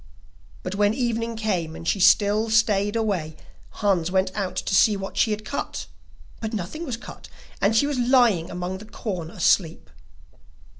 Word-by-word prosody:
But 185 - -4
when 205 +1 +2
evening 230 -2 -1
came 180 -8 -2
and 165 - -8
she 200 - +1
still 205 +3 +4
stayed 210 -2 +2
away, 190 -9 -1 0.5
Hans 180 -4 +2
went 190 0 +1
out 195 -3 -3
to - - -2
see 205 +2 +5
what 195 0 -6
she - - +2
had 215 0 -3
cut, 280 - -4 0.5
but 220 0 -4
nothing 215 - -4
was 240 -4 -3
cut, 240 - -11 0.3
and 205 +3 +3
she 255 - +4
was 285 -3 -1
lying 240 -9 +3
among 180 +1 -4
the 215 - -11
corn 185 -7 -5
asleep. 165 -1 +1
205 Hz, 165 wpm, -24 LUFS, 185-225 Hz, 0.5 s, see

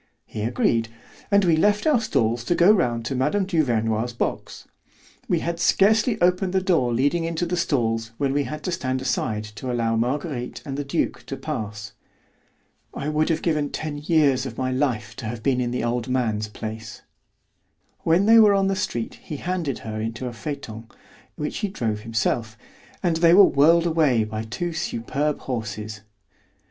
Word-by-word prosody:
He 110 - -6
agreed, 115 0 +1 0.4
and 200 -1 +4
we 170 -2 +4
left 205 +5 +2
our 295 -7 +3
stalls 120 - 0
to 175 - +1
go 175 +4 +6
round 120 - +1
to 135 - -2
Mme. 150 +10 +1
Duvernoy's 120 - 0
box. 120 - -4 0.6
We 170 - +1
had 170 0 -3
scarcely 215 +5 +3
opened 180 +1 +2
the 190 - +3
door 165 -10 +2
leading 145 +8 +1
into 165 +1 -1
the 175 +1 -1
stalls 115 -9 0
when 140 -2 0
we 145 0 +1
had 155 0 -6
to 180 - -2
stand 130 -5 -2
aside 110 -4 -1
to 105 +4 -6
allow 115 -2 0
Marguerite 125 +2 -2
and 135 -2 -4
the 145 - -2
duke 140 - -2
to - - -5
pass. 105 0 -5 1.0
I 145 - -3
would 155 +2 +1
have 160 -1 0
given 150 -4 0
ten 150 -2 -4
years 145 -4 +2
of 115 - -9
my 130 -1 -1
life 130 -4 -1
to 115 - -5
have 110 0 -6
been 130 -2 +2
in 120 - -1
the 125 -1 -2
old 120 0 -1
man's 110 -5 0
place. 110 +1 -8 1.0
When 170 +4 +2
they 225 +1 +7
were 210 -2 +6
on 195 0 +2
the 195 - 0
street 120 - -3
he 150 - -6
handed 170 -6 -2
her 110 -1 -4
into 115 +3 -4
a 125 - -4
phaeton, 115 -4 -7 0.5
which 150 - -4
he 210 - -1
drove 115 - -2
himself, 115 0 -2 0.5
and 170 -3 +2
they 170 +1 +6
were 200 - +9
whirled 165 +4 +4
away 155 -9 +3
by 110 +1 -5
two 170 +10 -4
superb 150 -1 -2
horses. 110 -3 -5
135 Hz, 180 wpm, -23 LUFS, 115-170 Hz, 1.0 s, were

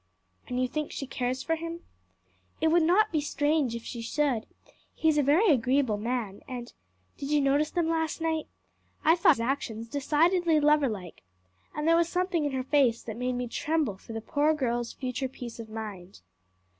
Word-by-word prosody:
"And 250 0 -2
you 255 - +2
think 305 +4 -3
she 275 - -4
cares 255 0 -2
for 325 - 0
him?" 335 +1 -6 0.8
"It 320 - +3
would 340 +2 +4
not 375 +7 +4
be 310 -3 +1
strange 290 -3 0
if 235 - -6
she 235 - -6
should; 250 -1 0 0.5
he 320 - 0
is 300 -1 +3
a - - +5
very 315 +9 +4
agreeable 255 -4 +2
man, 225 -3 -3
and 245 -2 -7 0.4
Did 275 - -5
you 300 0 +3
notice 285 +2 +2
them 345 -2 0
last 320 -1 -1
night? 320 -1 -1 0.6
I 320 +2 +6
thought 335 -3 +5
his 230 - -4
actions 230 -3 -2
decidedly 315 +5 +2
loverlike, 275 - +1 0.5
and 300 +1 -2
there 330 - +6
was 335 0 +2
something 355 -3 0
in 290 - 0
her 260 -1 -1
face 265 -4 +2
that 220 - -6
made 250 +2 -1
me 245 0 -2
tremble 295 -2 -1
for 210 +4 -11
the 225 - -4
poor 300 +6 +1
child's 240 -3 -1
future 255 0 -3
peace 240 -2 -9
of 225 -1 -8
mind." 205 - -8
280 Hz, 190 wpm, -28 LUFS, 240-315 Hz, 0.8 s, I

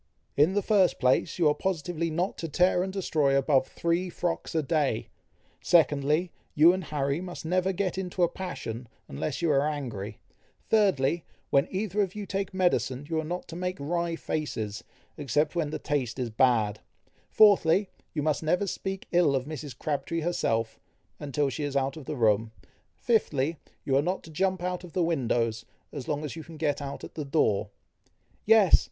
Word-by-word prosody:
"In 155 +7 +4
the 205 - +1
first 195 -5 +3
place, 130 +4 +2
you 170 -4 +4
are 150 - +4
positively 170 -1 -2
not 175 +5 -1
to 165 - -4
tear 180 +4 +3
and 190 +1 -2
destroy 155 -8 +1
above 135 -1 +3
three 170 +2 -1
frocks 170 -1 -3
a 160 - +2
day; 145 -7 0 0.5
secondly, 155 +1 +3 0.2
you 160 +4 +7
and 185 -2 -3
Harry 140 +1 -1
must 180 -2 -7
never 185 +3 +1
get 190 0 -2
into 180 -1 -1
a - - +5
passion, 130 -10 -6 0.2
unless 135 - -4
you 165 - +3
are 140 -1 +4
angry; 125 -10 -4 0.5
thirdly, 175 -7 +3 0.3
when 140 0 +4
either 205 +1 -1
of 190 -1 -2
you 210 -1 -5
take 195 0 -3
medicine, 175 -8 0
you 160 - +1
are - - -2
not 175 +3 -4
to 165 - -7
make 180 +1 -3
wry 170 +3 -1
faces, 110 -11 -3 0.3
except 150 +3 0
when 160 -4 0
the - - -3
taste 135 -6 -2
is 125 -3 -3
bad; 110 -3 +2 0.5
fourthly, 200 -2 +5 0.2
you 150 - -2
must 155 -1 +1
never 175 +5 +1
speak 195 0 -4
ill 170 -5 +4
of 130 -1 -1
Mrs. 145 -4 -7
Crabtree 150 +2 -2
herself, 115 -9 -1 0.4
until 145 0 -1
she 150 - -4
is 140 -1 -1
out 135 0 0
of 155 -4 -9
the 150 - -4
room; 110 -1 +2 0.5
fifthly, 160 - +1 0.3
you 135 - +1
are 135 - +5
not 180 +5 -2
to 160 - -12
jump 185 +2 0
out 180 0 -2
of 175 -3 -11
the 180 - +1
windows, 120 -8 0 0.3
as 140 -4 -7
long 150 0 -2
as 150 - -6
you 160 - -7
can 165 0 -12
get 150 -2 0
out 140 -1 -6
at - - -9
the 155 - -4
door" 135 -8 +1 0.8
"Yes!" 220 -5 +7
155 Hz, 185 wpm, -28 LUFS, 140-180 Hz, 0.8 s, you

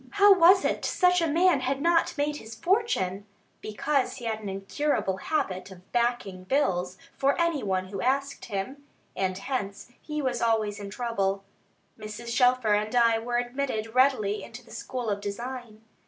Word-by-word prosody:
How 405 0 +7
was 375 +1 +6
it - - 0
such 360 -1 +3
a 330 - +2
man 335 0 +3
had 265 +1 -1
not 330 +1 +2
made 295 +1 0
his 225 -2 -10
fortune? 225 - 0 0.3
Because 255 +6 -1
he 240 - -9
had 220 -1 -2
an 210 -2 -6
incurable 195 +1 -1
habit 190 -8 -2
of 185 -1 -15
"backing 235 -6 -1
bills" 185 -6 0 0.2
for 275 +4 +1
any 335 -4 +1
one 185 -2 -1
who 195 -1 -5
asked 275 +2 -1
him; 240 +7 -5 0.3
and 185 -1 -1
hence 205 -1 -4
he 300 -1 -4
was 260 -4 -1
always 220 -3 +1
in 200 -1 -6
trouble. 200 -4 -1 0.6
Mrs. 220 +2 -6
Shelfer 250 -4 +3
and 215 +3 0
I 230 -2 +4
were 240 +1 -2
admitted 245 -3 -2
readily 250 -6 +2
into 235 +3 -11
the 225 - -17
school 245 +1 -5
of 205 -1 -1
design. 225 +1 -6
235 Hz, 170 wpm, -27 LUFS, 205-280 Hz, 0.6 s, How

